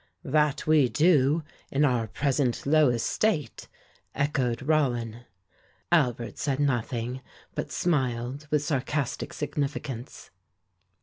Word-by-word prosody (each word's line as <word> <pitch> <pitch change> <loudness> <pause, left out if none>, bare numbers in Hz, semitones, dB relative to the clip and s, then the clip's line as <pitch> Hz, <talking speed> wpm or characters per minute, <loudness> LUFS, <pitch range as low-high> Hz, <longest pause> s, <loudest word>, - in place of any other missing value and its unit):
"That 150 0 +1
we 155 -5 +4
do, 150 0 +3 0.3
in 145 +2 +3
our 120 -5 +1
present 130 +2 0
low 150 -1 +5
estate," 140 - -1 0.5
echoed 135 -4 0
Rollin. 120 -6 0 0.7
Albert 125 -8 +1
said 140 -2 -1
nothing, 125 -2 -1 0.3
but - - -4
smiled 130 -3 -1
with 150 -1 +1
sarcastic 140 -2 -2
significance. 140 -3 -4
140 Hz, 100 wpm, -27 LUFS, 125-150 Hz, 0.7 s, low